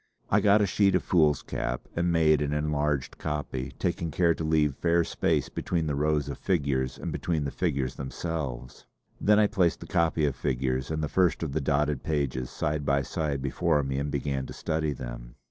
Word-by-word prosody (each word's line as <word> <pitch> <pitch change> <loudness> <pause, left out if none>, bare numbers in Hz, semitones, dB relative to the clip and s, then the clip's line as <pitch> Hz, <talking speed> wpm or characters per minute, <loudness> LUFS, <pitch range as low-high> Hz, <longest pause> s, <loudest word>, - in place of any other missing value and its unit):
I - - +4
got 105 +1 +5
a - - +4
sheet 100 0 +3
of 90 - +1
foolscap 75 -6 +1
and 85 +1 +1
made 80 -3 +4
an 75 0 -1
enlarged 75 -2 -1
copy, 75 -4 -4
taking 85 -1 -1
care 85 +2 +3
to 80 - -5
leave 80 -2 +2
fair 85 0 +2
space - - 0
between 85 -3 -2
the 75 - -1
rows 75 +1 +1
of 70 - -5
figures 70 -7 0
and - - -5
between 80 -4 -1
the 70 - -3
figures 70 -8 -1
themselves. 70 -3 -5 0.3
Then 105 0 +4
I 105 - +5
placed 90 -4 +1
the - - -8
copy 80 -2 +1
of 70 -3 0
figures 65 0 -1
and 80 0 -2
the - - 0
first 85 -1 +2
of 80 - -2
the 75 +3 -1
dotted 75 0 +1
pages 70 -5 -1
side 75 0 -2
by 70 0 +2
side 70 -3 -2
before 75 +2 +1
me 65 0 -2
and 70 +1 -2
began 70 -1 -2
to - - -8
study 80 -1 -1
them. - - -7
75 Hz, 195 wpm, -28 LUFS, 70-80 Hz, 0.3 s, got